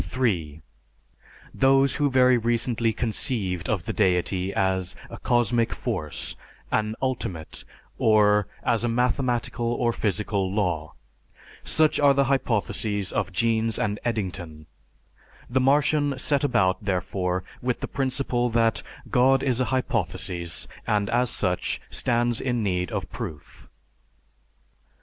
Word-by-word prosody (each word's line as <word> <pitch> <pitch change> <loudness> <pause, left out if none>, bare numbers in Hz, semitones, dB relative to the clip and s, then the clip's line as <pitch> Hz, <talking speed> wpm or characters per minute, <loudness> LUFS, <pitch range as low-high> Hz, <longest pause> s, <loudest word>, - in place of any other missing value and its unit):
(3) 85 - -2 0.9
Those 135 0 +4
who 145 -1 +2
very 130 -1 +5
recently 115 0 +1
conceived 105 -5 -1
of 95 -6 -1
the - - -3
deity 95 -1 +1
as 95 -1 0 0.2
a - - -8
"cosmic 120 -1 +2
force," 95 - -3 0.4
an 110 0 0
"ultimate," 95 -11 -3 0.4
or 105 -2 +4 0.2
as 115 0 +1
a - - +1
mathematical 120 0 0
or 120 0 +1
physical 100 -3 -1
law. 90 -7 -1 0.7
Such 155 -1 +3
are 140 -1 +5
the 140 - +4
hypotheses 110 -6 0
of 100 -2 -1
Jeans 115 +2 +1
and 105 0 -1
Eddington. 90 -9 -4 0.8
The 130 +2 +1
Martian 145 +1 +2
set 140 +2 0
about, 95 -8 +2
therefore, 90 -1 -1 0.2
with 125 -1 -2
the - - -3
principle 130 -2 0
that, 115 -1 +2 0.3
"God 130 +2 +4
is 130 -3 +1
a 130 - +2
hypothesis, 90 -9 -2 0.2
and 105 -1 +1
as 120 +1 +2
such, 90 -4 -1
stands 120 -1 +1
in 120 -3 -1
need 90 -3 -1
of - - -3
proof." 75 -3 -8
115 Hz, 120 wpm, -25 LUFS, 95-125 Hz, 0.9 s, very